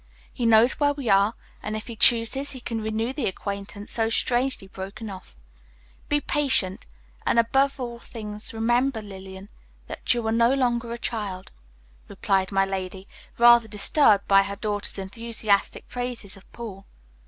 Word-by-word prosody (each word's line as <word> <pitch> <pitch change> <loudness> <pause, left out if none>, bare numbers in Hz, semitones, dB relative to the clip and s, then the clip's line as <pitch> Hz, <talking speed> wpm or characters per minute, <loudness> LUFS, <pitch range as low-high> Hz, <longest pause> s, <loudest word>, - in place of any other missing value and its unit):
He 235 - -1
knows 230 +2 +5
where 290 -1 +3
we 270 -5 -4
are, 200 +3 +4 0.3
and 215 +1 -3
if 215 - -7
he 230 - -7
chooses 235 +5 +3
he 260 - -8
can 230 -2 -4
renew 220 +3 -2
the 275 -4 -2
acquaintance 200 +1 -5
so 225 -1 +1
strangely 245 -1 +1
broken 195 +3 -7
off. 185 - -11 0.7
Be 290 - +2
patient, 270 -11 +1 0.4
and - - +1
above 270 +5 +2
all 240 -2 -5
things 210 -3 -7
remember, 240 +1 +1
Lillian, 190 0 -10 0.4
that - - -2
you 240 -2 +1
are 220 - +1
no 235 +3 +3
longer 240 -3 0
a 235 - -4
child," 205 -6 -4 0.6
replied 190 -1 0
my 195 0 +3
lady, 190 0 -5 0.3
rather 235 -1 +7
disturbed 210 0 +3
by 195 0 +6
her 200 0 -4
daughter's 205 -1 -2
enthusiastic 210 0 -1
praises 245 -5 -5
of 195 - -19
Paul. 200 -5 -9
225 Hz, 155 wpm, -25 LUFS, 200-240 Hz, 0.7 s, rather